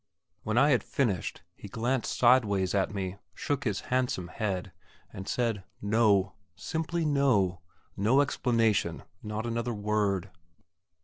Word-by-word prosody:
When 110 +2 -2
I 145 +4 +5
had 125 - +4
finished, 110 - -1
he - - -10
glanced 120 +4 -1
sideways 105 -7 +4
at 100 -1 +1
me, 95 -2 -4 0.2
shook 140 -1 -2
his 105 -4 -1
handsome 125 -9 0
head, 95 -3 -3 0.4
and 95 - -7
said, 115 -5 -1 0.2
"No"; 100 -3 +2 0.2
simply 160 - -2
"no" 120 - +2 0.3
no 115 +8 +3
explanation 115 - +1 0.2
not 105 +2 -4
another 115 0 -2
word. 105 -2 0
110 Hz, 125 wpm, -29 LUFS, 95-125 Hz, 0.4 s, I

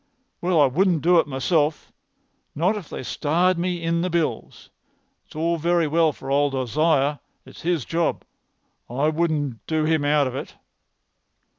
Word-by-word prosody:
"Well, 175 -2 +2
I 145 - +7
wouldn't 170 +3 +1
do 175 +1 +5
it 160 - +1
myself—not 155 +5 -2
if 200 -7 -7
they - - -6
starred 170 +7 +1
me 175 -1 -2
in 165 0 0
the 180 - -1
bills. 160 -9 -3 0.6
It's - - -18
all 165 +2 0
very 170 +1 +1
well 160 +1 +3
for 135 - -8
old 140 0 +2
Isaiah. 145 +3 +1 0.3
It's - - -13
his 170 -6 -1
job, 165 0 -1 0.7
and 125 +3 -6
I 150 +2 +3
wouldn't 155 -6 -1
do 160 -1 0
him 160 -2 +1
out 145 0 +3
of 130 - -3
it." 135 - -7
160 Hz, 160 wpm, -23 LUFS, 145-170 Hz, 0.7 s, I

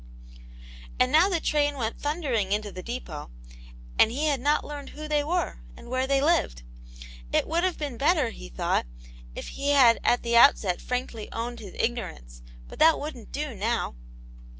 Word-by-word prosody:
And 255 0 +3
now 325 +6 +5
the 350 -4 0
train 290 -2 +1
went 230 -4 -4
thundering 280 - -1
into 210 0 -1
the 185 - -7
cjep6t, 210 -10 -6 0.7
and - - +7
he 285 +6 -1
had 290 -3 +1
not 295 +3 +2
learned 290 -1 -7
who 305 +1 -8
they 300 -1 +1
were, 330 - -1 0.2
and - - -12
where 255 +1 0
they 275 0 +3
lived. 270 - +1 0.7
It - - +1
would 335 +2 0
have 370 -1 0
been 285 -6 -4
better, 290 -3 +2
he - - -10
thought, - - -1 0.5
if - - -6
he 280 +1 -3
had 255 -5 +6
at 245 - +2
the 235 0 0
outset 220 -7 +5
frankly 250 -3 -4
owned 235 +1 -4
his 200 -5 -10
Ignorance, 170 - -3 0.3
but - - -12
that 320 0 +6
wouldn't 285 -6 -7
do 295 -2 -3
now. 225 - -1
255 Hz, 175 wpm, -26 LUFS, 225-295 Hz, 0.7 s, and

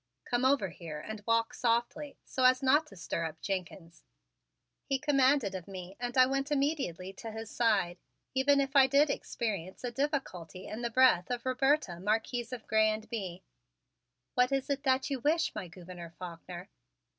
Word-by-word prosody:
"Come 245 +1 0
over 260 -8 +3
here 165 -3 -8
and 215 +7 -7
walk 230 0 +2
softly, 240 +5 -1
so 260 - -2
as 255 +1 +5
not 295 +4 +4
to 195 - -14
stir 170 -1 -3
up 160 0 -6
Jenkins," 180 -3 -5 0.8
he 275 - 0
commanded 265 - +2
me 185 -1 -8
and 245 +1 -3
I 255 - +8
went 275 +2 -1
immediately 275 - -1
to 225 +4 -8
his 220 0 -7
side, 195 -7 +1 0.3
even 280 +2 +4
if 275 0 -1
I 270 -1 +8
did 280 +2 +4
experience 200 -9 -4
a 245 - -2
difficulty 235 - -3
in 220 - -6
the 235 - -1
breath 250 -7 +4
of 245 -1 -3
Roberta, 260 - +1
Marquise 225 +4 -1
of 245 -3 -6
Grez 215 0 +3
and - - -20
Bye. 190 -6 -4 0.9
"What 250 +1 +3
is 270 +1 0
it 275 -1 -1
that 265 +2 +2
you 270 - -1
wish, 315 +6 +1
my 205 -4 -5
Gouverneur 175 0 -10
Faulkner?" 180 +1 -8
235 Hz, 170 wpm, -31 LUFS, 185-270 Hz, 0.9 s, I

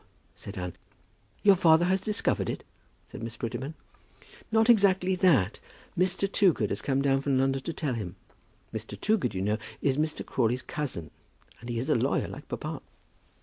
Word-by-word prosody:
said 100 +1 -9
Anne. 90 -1 -4 0.7
"Your 200 -1 +7
father 170 -1 +5
has 190 +1 +2
discovered 210 +1 0
it?" - - -4 0.4
said - - -10
Miss 115 0 -6
Prettyman. 130 +6 -4 0.8
"Not 220 0 +4
exactly 195 -5 +4
that. 140 - +3 0.4
Mr. 185 +2 +1
Toogood 180 - +3
has 100 - -2
come 135 +2 0
down 135 -1 +3
from 140 -1 +1
London 135 0 +1
to 165 - -4
tell 150 -5 -2
him. 105 -6 -5 0.6
Mr. - - -6
Toogood, 195 - +1
you 95 - -1
know, 105 +2 0 0.2
is 140 0 +1
Mr. 155 0 -1
Crawley's 125 +1 0
cousin; 120 - -4 0.5
and 120 - -9
he 120 - -2
is 125 +4 -2
a 155 - +4
lawyer, 125 +4 +1
like - - -9
papa." - - -5
135 Hz, 170 wpm, -28 LUFS, 115-180 Hz, 0.8 s, Your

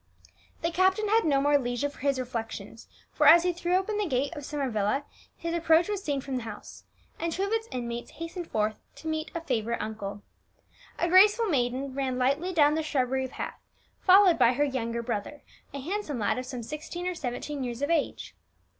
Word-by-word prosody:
'" - - -33
The 335 - +1
captain 375 +4 +2
had 445 +2 +3
no 280 -3 +3
more 290 +1 +4
leisure 245 +2 -1
for 285 - -12
his 275 -1 +1
reflections, 225 -3 -6 0.2
for, - - +3
as 340 0 +9
he 360 0 +1
threw 345 +1 0
open 415 +3 0
the 415 - 0
gate 280 +3 -1
of 290 - -7
Summer 285 -1 -2
Villa, 220 +4 0 0.3
his 335 0 -3
approach 335 0 +4
was 410 -2 -2
seen 285 -5 -1
from 265 -1 -3
the - - -3
house, 220 -2 -9 0.3
and 335 0 -1
two 380 - -1
of 400 - -2
its 450 0 0
inmates 240 -1 -5
hastened 335 +1 -6
forth 215 0 -1 0.2
to 320 - -9
meet 315 0 -2
a 335 - -2
favourite 235 -6 -1
uncle. 205 -2 -5 0.7
A 345 - +1
graceful 410 +6 +6
maiden 260 -3 0
ran 265 -2 -1
lightly 280 +8 +1
down 300 -4 +4
the 320 - 0
shrubbery 265 -3 0
path, - - -6 0.4
followed 375 -2 +6
by 235 - +5
her 285 +4 +1
younger 235 -4 -2
brother, 235 +5 -4 0.3
a 280 - -6
handsome 335 -1 -3
lad 225 +2 0
of 255 - -6
some 250 -2 -5
sixteen 310 +7 -6
or 365 - -1
seventeen 280 -1 -4
years 245 +1 -4
of 285 - 0
age. 320 -4 -1
285 Hz, 205 wpm, -28 LUFS, 245-340 Hz, 0.7 s, as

